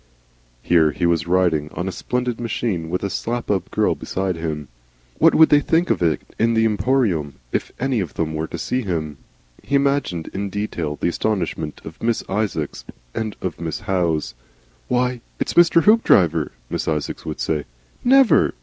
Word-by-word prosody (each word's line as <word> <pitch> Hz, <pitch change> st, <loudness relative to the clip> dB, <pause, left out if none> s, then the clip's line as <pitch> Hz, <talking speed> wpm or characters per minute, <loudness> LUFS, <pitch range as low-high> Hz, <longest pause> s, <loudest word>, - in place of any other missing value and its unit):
Here 80 Hz, -3 st, +4 dB
he 85 Hz, -, -1 dB
was 85 Hz, 0 st, +1 dB
riding 85 Hz, -4 st, +2 dB
on 90 Hz, -, -3 dB
a -, -, -1 dB
splendid 125 Hz, +6 st, -2 dB
machine 110 Hz, -8 st, -2 dB
with 90 Hz, +3 st, -2 dB
a 100 Hz, -, -1 dB
Slap 120 Hz, +2 st, -2 dB
up 95 Hz, -2 st, -1 dB
girl -, -, +2 dB
beside 95 Hz, -1 st, -3 dB
him. 80 Hz, -3 st, -4 dB, 0.5 s
What -, -, +5 dB
would 160 Hz, -, +7 dB
they 145 Hz, -, +6 dB
think 165 Hz, +4 st, +1 dB
of -, -, 0 dB
it 80 Hz, -3 st, +2 dB, 0.2 s
in 115 Hz, +1 st, +3 dB
the 110 Hz, 0 st, +3 dB
Emporium 105 Hz, -, +1 dB, 0.2 s
if -, -, -2 dB
any 130 Hz, -2 st, 0 dB
of 95 Hz, -, -4 dB
them 80 Hz, -1 st, -1 dB
were 80 Hz, +1 st, -2 dB
to 85 Hz, -, -6 dB
see 125 Hz, +10 st, -1 dB
him? 80 Hz, -, -3 dB, 0.4 s
He 140 Hz, -, -2 dB
imagined 140 Hz, -, +1 dB
in 100 Hz, +1 st, -3 dB
detail 90 Hz, -7 st, -3 dB
the -, -, +1 dB
astonishment 85 Hz, -6 st, -2 dB
of 80 Hz, -, -10 dB
Miss 115 Hz, 0 st, 0 dB
Isaacs 95 Hz, -7 st, -2 dB, 0.3 s
and 110 Hz, -2 st, -3 dB
of 95 Hz, -, -3 dB
Miss 80 Hz, -1 st, -3 dB
Howe. 85 Hz, -4 st, +1 dB, 0.7 s
"Why! 125 Hz, -1 st, 0 dB, 0.2 s
It's -, -, -1 dB
Mr. 170 Hz, -1 st, +5 dB
Hoopdriver," 90 Hz, -, +4 dB, 0.2 s
Miss -, -, -3 dB
Isaacs 75 Hz, -2 st, -2 dB
would 75 Hz, -, -4 dB
say. 75 Hz, -2 st, -1 dB, 0.4 s
"Never!" 265 Hz, 0 st, +5 dB
95 Hz, 175 wpm, -21 LUFS, 80-120 Hz, 0.7 s, would